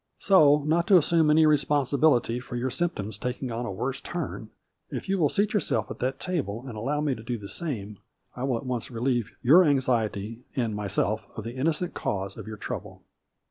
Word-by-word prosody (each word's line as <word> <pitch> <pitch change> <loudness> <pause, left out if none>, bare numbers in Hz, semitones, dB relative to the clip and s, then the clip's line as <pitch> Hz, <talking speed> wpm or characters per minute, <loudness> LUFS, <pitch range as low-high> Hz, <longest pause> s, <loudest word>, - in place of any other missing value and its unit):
So 150 -6 +5
not 165 +4 +1
to 195 - +7
assume 165 -1 +3
any 155 +1 +6
responsibility 140 -4 +2
for 125 0 -8
your 125 +1 -1
symp 175 +6 -1
toms 105 +1 -5
taking 125 +1 -3
on 120 +1 -3
a - - -3
worse 125 +8 -3
turn, 155 -10 -5 0.4
if - - -5
you 195 0 0
will 150 -4 +3
seat 210 +1 +1
yourself 210 - 0
at - - -7
that 130 +2 -2
table 135 - -3
and 120 - -7
allow 140 +8 -1
me 150 -3 +1
to 110 - -8
do 120 +1 -3
the 100 -2 -9
same, 105 - -4 0.4
I 125 - -5
will 130 -3 0
at 125 - -8
once 125 -3 -3
relieve 120 -1 -1
your 160 +9 +7
anxiety 115 - 0 0.2
and 115 -5 -1
myself 105 +1 -1
of 110 - -5
the 115 +2 -6
innocent 160 +6 0
cause 95 -1 -3
of - - -9
your 110 -1 -6
trouble." - - -7
125 Hz, 205 wpm, -27 LUFS, 110-150 Hz, 0.4 s, to